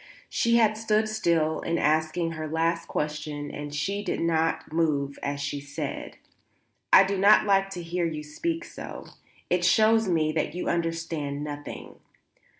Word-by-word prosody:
She 235 0 +2
had 220 -2 +4
stood 215 -1 +1
still 170 -7 +1
in 170 - -1
asking 160 +2 +1
her 155 -1 -5
last 165 +2 0
question 150 -1 -3
and 145 0 -6
she 195 +8 -2
still - - -2
did - - -3
not 160 -1 0
move 145 -4 0
as 140 0 -3
she 145 0 -3
said: 140 0 -6 0.7
"I 190 - +9
do 195 0 -1
not 205 +3 +6
like 195 -1 +3
to 180 -3 -6
hear 170 +1 -1
you 155 -2 -5
speak 330 - -3
so. - - -8 0.5
It 180 0 +2
shows 220 +3 +4
me 155 -3 +2
that 155 0 -2
you 180 - -3
understand 165 -4 -2
nothing." 145 -1 -7
165 Hz, 160 wpm, -26 LUFS, 150-195 Hz, 0.7 s, I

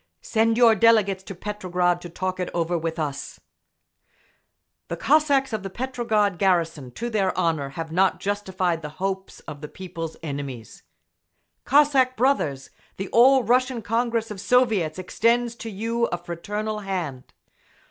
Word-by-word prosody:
Send 225 0 +2
your 235 -2 +7
delegates 215 -3 +4
to 195 - -7
Petrograd 180 -3 -1
to 175 - -8
talk 185 +2 -3
it 180 - -2
over 170 0 0
with 165 0 -2
us…. 145 -3 -4 1.5
The - - -4
Cossacks 280 -4 +3
of 215 - -1
the 195 - -5
Petrograd 220 -5 -1
garrison, 165 -8 +1
to 235 - -4
their 195 -4 0
honour, 155 -5 0
have 165 -1 -4
not 185 +3 +2
justified 190 -4 -1
the 150 - -6
hope 190 0 -2 0.2
of 145 - -8
the 150 - -6
People's 165 -2 -7
enemies…. 140 -6 -6 0.8
Cossack 275 -3 +4
brothers! 185 - 0 0.3
The 195 0 -4
All 260 +2 +6
Russian 250 +1 +1
Congress 230 0 -1
of 195 -3 -6
Soviets 215 -12 +2
extends 235 +6 +1
to 230 - -6
you 230 +3 -1
a 175 - -2
fraternal 205 +5 -4
hand. 175 -10 -4
195 Hz, 145 wpm, -24 LUFS, 170-230 Hz, 1.5 s, your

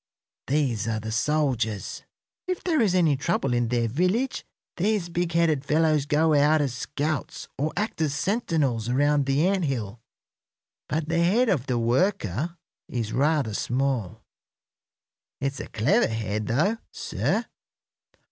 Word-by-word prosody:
These 130 -7 0
are 110 -1 -1
the 110 +1 -5
soldiers. 125 -5 -1 0.5
If 365 -1 -2
there 320 -6 +2
is 195 -5 +2
any 165 -5 +4
trouble 135 -2 0
in 120 -1 +1
their 120 0 +1
village 185 - 0 0.3
these 195 -1 0
big 170 0 -1
headed 160 -5 +2
fellows 155 -1 +2
go 155 +2 +3
out 150 +2 +4
as 140 -4 0
scouts 145 +4 -3
or 150 +3 -1
act 210 -5 -2
as 150 -2 0
sentinels 150 - 0
around 145 +2 +2
the 140 +4 +2
ant 190 -3 +1
hill. 115 -5 -3 0.9
But 155 0 -1
the 170 +1 +1
head 225 +8 +3
of 140 -9 0
the 125 - 0
worker 135 - 0 0.3
is 115 -3 -3
rather 140 -4 +1
small. 125 -4 -1 1.2
It's 135 0 -2
a - - -6
clever 110 +1 +2
head, 110 -1 -3
though, 165 - +1
sir. - - -1
145 Hz, 140 wpm, -25 LUFS, 120-170 Hz, 1.2 s, any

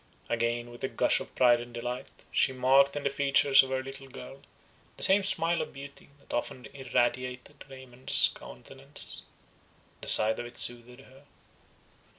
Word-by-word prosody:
Again, 120 +1 -2
with 120 - -13
a - - 0
gush - - +1
of - - -11
pride 120 -2 +4
and 120 0 -10
delight, 125 +1 -7
she 130 - +2
marked 135 +2 +3
in 145 - -4
the 140 - +1
features 140 0 +5
of 135 - -5
her 130 0 -2
little 135 0 -9
girl, 135 +1 -11 0.6
the - - -4
same 195 +2 +5
smile 170 -3 0
of - - -7
beauty 140 +1 -12
that 140 - -13
often 125 +1 -4
irradiated 125 +1 -3
Raymond's 130 -1 0
countenance. 135 - -10 0.8
The - - -9
sight 110 +1 +5
of 120 - -5
it 120 - -15
soothed 120 +1 -4
her. 135 +1 -19
130 Hz, 160 wpm, -28 LUFS, 120-140 Hz, 0.8 s, features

